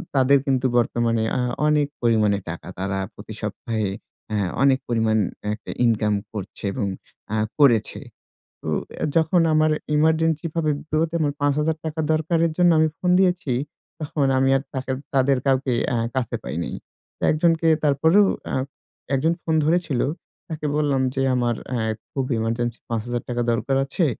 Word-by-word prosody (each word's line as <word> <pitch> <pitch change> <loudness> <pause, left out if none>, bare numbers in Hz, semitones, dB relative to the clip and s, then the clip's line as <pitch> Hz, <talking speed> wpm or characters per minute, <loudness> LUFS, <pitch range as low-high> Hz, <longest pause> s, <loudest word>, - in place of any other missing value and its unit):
তাদের 135 +1 +5
কিন্তু, 135 -2 +1
বর্তমানে 115 -1 +1
আ - - +1 0.3
অনেক 150 -1 +3
পরিমাণে 110 -4 +3
টাকা। 85 - -7
তারা 95 +1 -2 0.2
প্রতি - - -10
সপ্তাহে, 110 -3 -2 0.4
আ - - +1 0.3
অনেক 135 -1 +4
পরিমাণ 110 -2 +1 0.4
একটা 105 - -8
ইনকাম 110 -2 +2 0.2
করছে 100 -3 -7
এবং 105 -6 -1 0.5
আ - - +1 0.2
করেছে। 120 -7 +4 0.6
তো - - -6 0.5
যখন 165 +2 +3
আমার 155 0 +4 0.3
ইমার্জেন্সি 160 +1 +2
ভাবে, 160 -2 +1
বিপদে 160 +1 -1
আমার 145 -2 +1
৫০০০ 150 +2 +1
টাকা 160 0 -3
দরকারের 165 +1 +1
জন্য 175 -1 +5
আমি 155 0 +4
ফোন 180 - 0
দিয়েছি, 180 -6 +1 0.5
তখন 150 -2 0
আমি 135 0 +3
আর 135 - -1
তাদের 130 0 -2 0.2
তাদের 135 0 +3
কাউকে 135 -1 +2 0.2
অ্যা 120 - 0 0.2
কাছে 130 -3 -2
পাই 70 +5 -5
নাই। - - -4 0.4
তো - - -19
একজনকে 165 +1 +2 0.2
তারপরেও, 160 +8 +4 0.2
অ্যা - - -2 0.6
একজন 155 +5 +2
ফোন 160 - 0
ধরেছিল। 165 -6 +1 0.5
তাকে 155 -2 -4
বললাম 145 -3 +1
যে, 135 - 0
"আমার 120 -2 +1
অ্যা 120 -3 -1 0.3
খুব 135 -2 -1
ইমার্জেন্সি 115 +1 -1
৫০০০ 120 +1 -2
টাকা 120 -1 -1
দরকার 135 +4 0
আছে। 155 +5 0
135 Hz, 150 wpm, -23 LUFS, 120-155 Hz, 0.6 s, তাদের